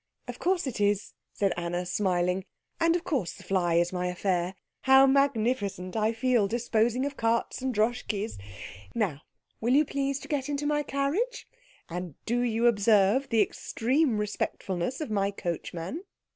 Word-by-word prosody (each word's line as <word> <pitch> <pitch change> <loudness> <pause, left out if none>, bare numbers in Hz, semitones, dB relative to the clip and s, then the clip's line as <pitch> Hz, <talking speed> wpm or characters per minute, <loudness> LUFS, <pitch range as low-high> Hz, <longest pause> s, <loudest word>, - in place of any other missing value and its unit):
"Of - - -7
course 365 -2 +1
it 250 -6 -3
is," 205 0 +1 0.2
said 195 -2 0
Anna, 175 +1 -2
smiling, 180 -1 0 0.3
"and 330 0 +3
of 350 - -1
course 255 - -1
the 185 - -13
fly 180 -2 +1
is 175 +1 +2
my 180 0 -1
affair. 180 0 -1 0.3
How 265 0 +8
magnificent 230 -9 +1
I 220 0 +2
feel, 235 -2 +2
disposing 240 +2 +1
of 285 -1 -3
carts 230 0 0
and 260 0 0
Droschkies. 220 - -1 0.6
Now, 185 -11 -1 0.4
will 240 +4 +2
you 300 +2 +5
please 275 -1 -1
to - - -9
get 290 -2 -2
into 290 0 -2
my 295 0 +2
carriage? 295 - -1 0.4
And 175 -3 -5
do 240 +2 +1
you 235 -1 +1
observe 215 +3 +4
the 225 -3 +4
extreme 250 +5 0
respectfulness 205 - -2
of 300 - -4
my 200 -1 +1
coachman?" 175 - -4
225 Hz, 160 wpm, -28 LUFS, 190-270 Hz, 0.6 s, How